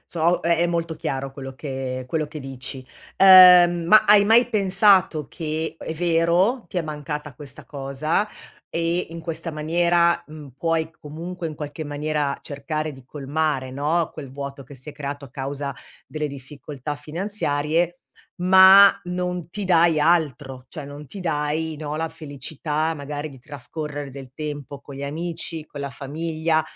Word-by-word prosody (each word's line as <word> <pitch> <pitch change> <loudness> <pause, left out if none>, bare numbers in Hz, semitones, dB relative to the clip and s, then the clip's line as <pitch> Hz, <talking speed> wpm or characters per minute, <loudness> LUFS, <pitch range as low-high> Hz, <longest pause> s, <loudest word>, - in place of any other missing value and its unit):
So 170 +1 +2
è 170 -1 +2
è 175 - +3
molto 170 -1 -2
chiaro 135 -3 -4
quello 135 -1 -8
che 130 -2 -5
quello 155 +3 -1
che 150 +1 -8
dici. 130 -1 -7 0.3
Uhm, 180 -2 +8
ma 215 +4 +7
hai 205 -1 +6
mai 230 +3 +6
pensato 190 - +4
che, 160 +1 -4
è 160 - -5
vero, 175 +8 +2
ti - - -8
è 175 - +1
mancata 150 -1 -5
questa 140 0 -10
cosa, 145 +8 -2 0.4
e 170 +2 -1
in 165 0 -8
questa 165 0 -4
maniera, 170 +2 +2
mhmm, 150 -2 -11
puoi 165 -1 0
comunque 165 +3 -7
in 155 - -5
qualche 150 +1 -6
maniera, 145 -1 -2
cercare 155 +2 -4
di 130 -2 -14
colmare 145 -1 -2
no, 150 +5 0
quel 140 -4 -9
vuoto 140 0 -7
che 140 - -13
si 135 +4 -9
è - - -13
creato 145 -1 -6
a 130 - -13
causa 140 +1 -4 0.3
delle 155 -1 -3
difficoltà 140 +1 -7
finanziarie, 165 0 -1 0.5
ma 190 +2 +9 0.2
non 180 -1 -3
ti 205 +3 -4
dai 170 -3 +4
altro. 145 -5 +1
Cioè 150 - -7
non 145 +1 -10
ti 195 - -9
dai 155 -1 -1
no, 150 0 -4
la 165 +1 -2
felicità 155 +1 -3
magari 145 +1 -5
di 135 - -13
trascorrere 145 +1 -7
del 130 -1 -10
tempo 145 -2 -6
con 140 - -11
gli 140 - -6
amici, 165 +1 -4
con 145 - -9
la 140 -1 -4
famiglia 160 +3 -1
155 Hz, 160 wpm, -23 LUFS, 140-170 Hz, 0.5 s, ma